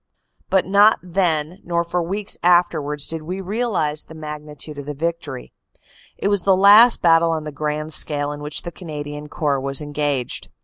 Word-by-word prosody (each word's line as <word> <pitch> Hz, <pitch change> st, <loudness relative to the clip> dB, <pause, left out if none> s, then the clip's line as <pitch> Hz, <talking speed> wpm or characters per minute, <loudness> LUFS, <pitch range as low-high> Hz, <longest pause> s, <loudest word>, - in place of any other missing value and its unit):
But 190 Hz, -1 st, +2 dB
not 205 Hz, +3 st, +5 dB
then 175 Hz, -1 st, -1 dB
nor 170 Hz, -1 st, -1 dB
for 175 Hz, +1 st, -2 dB
weeks 195 Hz, +4 st, -3 dB
afterward 165 Hz, -4 st, +2 dB
did 165 Hz, -1 st, -3 dB
we 180 Hz, +5 st, -5 dB
realize 195 Hz, -7 st, -1 dB
the 160 Hz, -, -13 dB
magnitude 150 Hz, -1 st, -8 dB
of 140 Hz, -, -9 dB
the 150 Hz, -, -5 dB
victory. 160 Hz, -4 st, -5 dB, 0.6 s
It -, -, -2 dB
was 200 Hz, -2 st, +1 dB
the 190 Hz, 0 st, +3 dB
last 210 Hz, +5 st, +7 dB
battle 165 Hz, -1 st, +4 dB
on 160 Hz, -1 st, -2 dB
the 150 Hz, -, -6 dB
grand 150 Hz, +1 st, -3 dB
scale 145 Hz, -1 st, 0 dB
in 145 Hz, 0 st, -7 dB
which 150 Hz, 0 st, -3 dB
the 175 Hz, -, -6 dB
Canadian 150 Hz, -4 st, -8 dB
Corps 145 Hz, -4 st, -1 dB
was 135 Hz, 0 st, +3 dB
engaged. 145 Hz, -4 st, -3 dB
160 Hz, 175 wpm, -20 LUFS, 150-180 Hz, 0.6 s, last